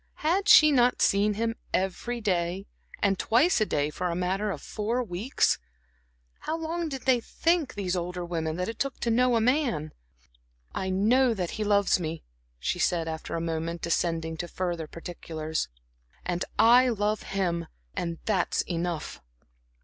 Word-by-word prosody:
Had 380 +6 +2
she 305 -6 +9
not 250 -2 +3
seen 205 +1 +3
him, 225 +2 0 0.2
every 195 +6 -2
day 185 -1 -1 0.4
and 195 -2 +2
twice 245 +4 +3
a 215 - +2
day, 145 +1 0
for 180 +4 -2
a 170 - -2
matter 190 +4 -1
of 175 -7 -3
four 230 - -2
weeks. 210 +5 0 0.8
How 320 - -3
long 330 +1 -3
did 270 -3 -6
they 260 -2 +4
think, 325 +2 0
these 190 -3 -1
older 180 0 -3
women, 160 -2 -2
that 180 +1 -2
it 225 -1 -6
took 275 -1 -2
to 235 - +1
know 250 +1 +3
a - - +4
man? 240 - +1 0.8
"I 190 - -2
know 230 +6 +3
that 180 -4 -2
he 215 - -3
loves 200 -2 +3
me," 160 -1 -4 0.3
she - - -2
said, 165 -2 +1
after 160 0 -4
a 165 - -2
moment, 165 0 -3
descending 165 -1 -1
to 175 - -4
further 175 -3 -3
particulars 160 -2 -5 0.6
"and 175 0 -1
I 245 +2 +6
love 210 -2 0
him, 175 -4 -2 0.3
and 170 -1 -3
that's 195 -5 +1
enough." 170 - -3
190 Hz, 165 wpm, -27 LUFS, 170-235 Hz, 0.8 s, she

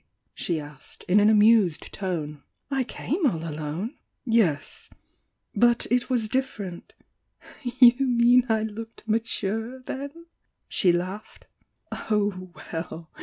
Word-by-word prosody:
she 170 -3 -2
asked, 145 -2 -10
in 190 +3 +5
an 210 +1 +5
amused 210 -5 +4
tone— 155 -6 -4 0.3
"I 270 -1 +1
came 315 +7 -3
all 165 -8 -2
alone!" 155 - -5 0.3
"Yes 220 - 0 0.3
— - - -43
^but 240 +3 +4
it 245 +1 +1
was 240 -4 +1
different 210 -7 -4 0.4
" - - -19 0.2
"You 250 +2 +7
meat 245 0 +5
I 220 -1 +2
looked 225 +1 -8
'mature,' 225 +2 -2
then?" 285 +6 -7 0.4
she 180 - +3
laughed. 185 +4 -4 0.6
"Oh, 205 -3 0
well! 165 0 -7
215 Hz, 120 wpm, -25 LUFS, 175-240 Hz, 0.6 s, You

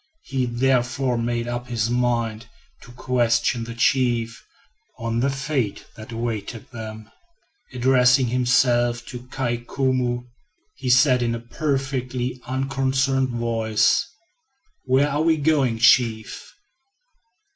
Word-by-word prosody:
He 130 -2 -2
therefore 125 +1 +1
made 120 0 -2
up 120 +1 -4
his 115 -1 -1
mind 120 -2 -1 0.3
to 120 - -14
question 120 -1 0
the 115 0 -8
chief 120 -2 +1 0.5
on 115 0 -2
the 135 +3 +1
fate 135 -5 -2
that 110 +1 -11
awaited 115 -1 -5
them. 110 -2 -8 0.6
Addressing 125 +1 +4
himself 120 -1 +2
to 125 0 -9
Kai 120 -2 -2
Koumou, 125 0 -1 0.5
he 130 - -5
said 125 0 +5
in 115 -1 0
a - - -5
perfectly 130 -1 -3
unconcerned 135 0 0
voice: 115 - +1 0.8
"Where 135 +2 +3
are 145 +1 -1
we 160 0 +3
going, 140 -6 +1
chief?" 115 -2 +2
125 Hz, 115 wpm, -23 LUFS, 115-130 Hz, 0.8 s, said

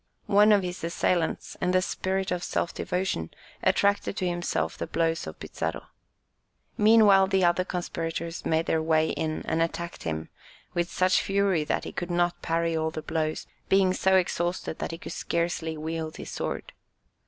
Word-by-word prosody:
One 210 +1 +5
of 205 -2 +5
his 180 -1 -5
assailants, 170 0 0
in 180 0 +1
a 185 - +5
spirit 190 0 -2
of 180 -1 -1
self - - -1
devotion, 180 - -2 0.3
attracted 200 0 +2
to 185 - 0
himself 175 - -1
the 85 - -4
blows 165 - 0
of 80 - -8
Pizarro. - - -4 0.9
Meanwhile 210 -3 +6
the 190 -1 +3
other 175 +1 +3
conspirators 170 -2 -4
made 160 +1 +1
their 160 - +1
way 160 0 +2
in 155 -1 -2
and 160 - 0
attacked 170 +1 -3
him 80 -1 -4 0.4
with 175 0 0
such 185 0 +3
fury 195 -4 +1
that - - -1
he - - -6
could 175 - -4
not 175 0 +1
parry 165 0 0
all 160 0 0
the 155 -1 -6
blows, 155 -1 -2 0.2
being 190 -1 +4
so 190 0 +3
exhausted 175 -2 0
that - - -3
he 165 - -5
could - - -8
scarcely 170 -1 -2
wield 160 0 -4
his - - -7
sword. - - -4
175 Hz, 170 wpm, -27 LUFS, 160-185 Hz, 0.9 s, Meanwhile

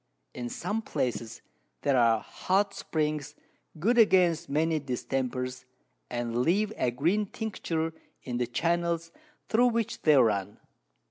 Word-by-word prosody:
In 120 -1 -5
some 215 - -2
Places 115 - -3 0.4
there 140 -2 +3
are 115 -3 +4
hot 195 +2 0
Springs, 150 -4 -2 0.4
good 230 +10 +2
against 175 -6 +4
many 155 +2 +1
Distempers, 130 -1 -3 0.4
and 120 -1 -2
leave 205 +9 +2
a 125 - +1
green 170 - +1
Tincture 165 -7 -3 0.3
in 125 -2 -3
the 120 -1 0
Channels 170 +4 0 0.4
thro' 240 +3 +4
which 230 -1 -1
they 155 -2 +5
run. 105 -5 +2
155 Hz, 125 wpm, -28 LUFS, 125-185 Hz, 0.4 s, they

